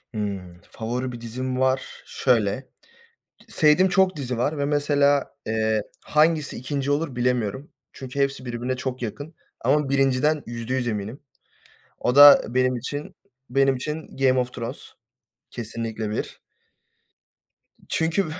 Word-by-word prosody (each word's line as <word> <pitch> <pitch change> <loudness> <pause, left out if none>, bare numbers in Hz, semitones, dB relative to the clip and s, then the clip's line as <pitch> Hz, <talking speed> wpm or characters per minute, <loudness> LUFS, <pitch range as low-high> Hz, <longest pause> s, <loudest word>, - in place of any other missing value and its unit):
Hımm. 95 -4 -5
Favori 125 +3 -3
bir 120 - -9
dizim 130 +2 -4
var. 130 0 -1
Şöyle, 120 0 0 0.8
sevdiğim 160 +5 +4
çok 190 -1 +3
dizi 130 -4 -3
var 145 +6 0
ve, 140 - 0
mesela, 145 -1 +2
eee, 110 -1 +1 0.2
hangisi 155 0 +2
2. 140 +2 -2
olur 145 -2 -1
bilemiyorum. 125 +1 -1 0.2
Çünkü 130 +1 -7
hepsi 140 -1 0
birbirine 120 +1 -3
çok 130 -1 -4
yakın, 145 +8 -6 0.3
ama 140 +3 +2
1.´sinden 135 +2 +2
%100 120 +2 -3
eminim. 110 +3 -4 0.8
O 125 - 0
da 145 0 +10
benim 130 0 +3
için, 145 +5 -5 0.3
benim 135 +1 +3
için 150 +4 -6
Game 130 -1 +3
of 125 0 -2
Thrones, 115 +3 -7 0.6
kesinlikle 115 -1 -5
1. 105 - -5 1.5
Çünkü, 165 +4 +1
130 Hz, 125 wpm, -24 LUFS, 120-145 Hz, 1.5 s, da